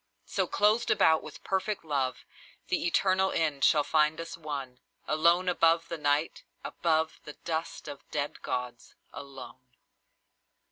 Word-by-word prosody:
So, -, -, -1 dB
clothed 210 Hz, +3 st, +2 dB
about 160 Hz, 0 st, +4 dB
with -, -, -11 dB
perfect 190 Hz, -1 st, -2 dB
love, 135 Hz, -4 st, -2 dB, 0.4 s
The -, -, +1 dB
eternal 190 Hz, +2 st, +2 dB
end 150 Hz, -4 st, 0 dB
shall 150 Hz, -3 st, +5 dB
find 155 Hz, +1 st, +2 dB
us 165 Hz, 0 st, -6 dB
one, 140 Hz, -6 st, -6 dB, 0.3 s
Alone 170 Hz, +4 st, +3 dB
above 165 Hz, -1 st, +3 dB
the 170 Hz, -, -3 dB
Night, 145 Hz, +2 st, 0 dB, 0.2 s
above 160 Hz, -1 st, 0 dB
The 150 Hz, -, -8 dB
dust 160 Hz, 0 st, -4 dB
of 145 Hz, -2 st, -7 dB
the -, -, -34 dB
dead 145 Hz, -1 st, -3 dB
gods, 125 Hz, -1 st, -5 dB, 0.2 s
alone. 135 Hz, -2 st, -10 dB
155 Hz, 140 wpm, -29 LUFS, 145-170 Hz, 0.4 s, shall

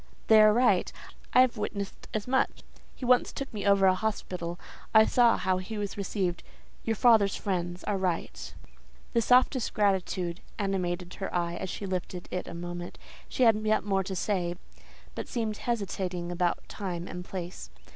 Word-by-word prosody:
"They 220 Hz, -1 st, +8 dB
are 215 Hz, 0 st, +7 dB
right; 245 Hz, +4 st, +3 dB, 0.4 s
I 255 Hz, -, +7 dB
have 255 Hz, -2 st, +2 dB
witnessed 200 Hz, -2 st, -5 dB
as 215 Hz, +1 st, -3 dB
much. 265 Hz, +1 st, 0 dB, 0.3 s
He 255 Hz, -, -6 dB
once 250 Hz, 0 st, +4 dB
took 275 Hz, -3 st, -6 dB
me 205 Hz, -2 st, -3 dB
over 200 Hz, -1 st, +5 dB
a 185 Hz, -, +6 dB
hospital; 185 Hz, -4 st, -3 dB, 0.4 s
I 220 Hz, 0 st, +9 dB
saw 240 Hz, 0 st, +4 dB
how 185 Hz, -1 st, 0 dB
he 200 Hz, +4 st, -6 dB
was 205 Hz, -1 st, -3 dB
received: 190 Hz, -3 st, -2 dB, 0.4 s
your 225 Hz, -, 0 dB
father's 220 Hz, -3 st, +5 dB
friends 175 Hz, -2 st, -3 dB
are 200 Hz, -2 st, -1 dB
right." 180 Hz, -3 st, -2 dB, 0.6 s
The 235 Hz, -, +3 dB
softest 250 Hz, +1 st, +3 dB
gratitude 185 Hz, -3 st, 0 dB, 0.2 s
animated 180 Hz, -3 st, -2 dB
her 195 Hz, -, -3 dB
eye 170 Hz, -1 st, -1 dB
as 190 Hz, -, -4 dB
she 200 Hz, -, -5 dB
lifted 185 Hz, -1 st, -4 dB
it 180 Hz, -, -3 dB
a 170 Hz, -, -7 dB
moment. 175 Hz, 0 st, -6 dB, 0.3 s
She 255 Hz, -, +1 dB
had 225 Hz, -2 st, +6 dB
yet 215 Hz, 0 st, +2 dB
more 195 Hz, -2 st, +1 dB
to 190 Hz, -1 st, -4 dB
say, 175 Hz, -2 st, -1 dB, 0.6 s
but -, -, -5 dB
seemed 220 Hz, -4 st, -2 dB
hesitating 190 Hz, -6 st, -3 dB
about 175 Hz, 0 st, -1 dB
time 180 Hz, -4 st, -5 dB
and 180 Hz, -, -6 dB
place. 180 Hz, -, -7 dB
195 Hz, 170 wpm, -29 LUFS, 180-215 Hz, 0.6 s, I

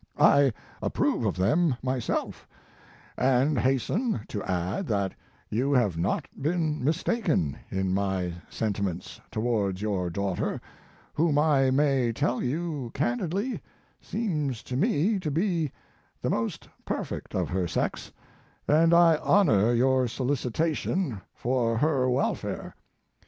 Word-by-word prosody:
I 140 Hz, -2 st, +6 dB, 0.3 s
approve -, -, 0 dB
of -, -, 0 dB
them 150 Hz, -, +3 dB
myself, 130 Hz, -2 st, -2 dB, 0.7 s
and 130 Hz, +2 st, +3 dB
hasten 135 Hz, -, 0 dB
to 100 Hz, -, -4 dB
add 95 Hz, -, -2 dB
that 100 Hz, -3 st, 0 dB, 0.4 s
you 130 Hz, +6 st, +1 dB
have 110 Hz, -9 st, +3 dB
not 85 Hz, +4 st, 0 dB, 0.2 s
been 155 Hz, -2 st, 0 dB
mistaken 160 Hz, -, +1 dB
in 95 Hz, -1 st, -1 dB
my 95 Hz, -3 st, 0 dB, 0.2 s
senti 105 Hz, -2 st, -2 dB
ments 90 Hz, -3 st, -4 dB
towards 110 Hz, -5 st, 0 dB
your 95 Hz, -4 st, -1 dB
daughter, 95 Hz, +1 st, -2 dB, 0.5 s
whom 155 Hz, -1 st, +2 dB
I 145 Hz, -3 st, +4 dB
may 135 Hz, -3 st, +2 dB
tell 120 Hz, +2 st, 0 dB
you 145 Hz, -1 st, -2 dB
candidly 180 Hz, -, -1 dB, 0.4 s
seems 150 Hz, -, -2 dB
to 125 Hz, -, -5 dB
me 175 Hz, -, +2 dB
to 165 Hz, -, -3 dB
be 165 Hz, -2 st, 0 dB, 0.5 s
the -, -, -1 dB
most -, -, -2 dB, 0.2 s
perfect -, -, -4 dB
of -, -, 0 dB
her 90 Hz, -1 st, 0 dB
sex, -, -, -2 dB, 0.6 s
and 165 Hz, +3 st, +5 dB
I 170 Hz, -2 st, +6 dB
honor 120 Hz, -, +4 dB
your 130 Hz, +1 st, +3 dB
solicitation 140 Hz, -, -1 dB
for 120 Hz, -2 st, 0 dB
her 135 Hz, -2 st, +2 dB
welfare. 125 Hz, +2 st, -1 dB
130 Hz, 120 wpm, -27 LUFS, 105-155 Hz, 0.7 s, I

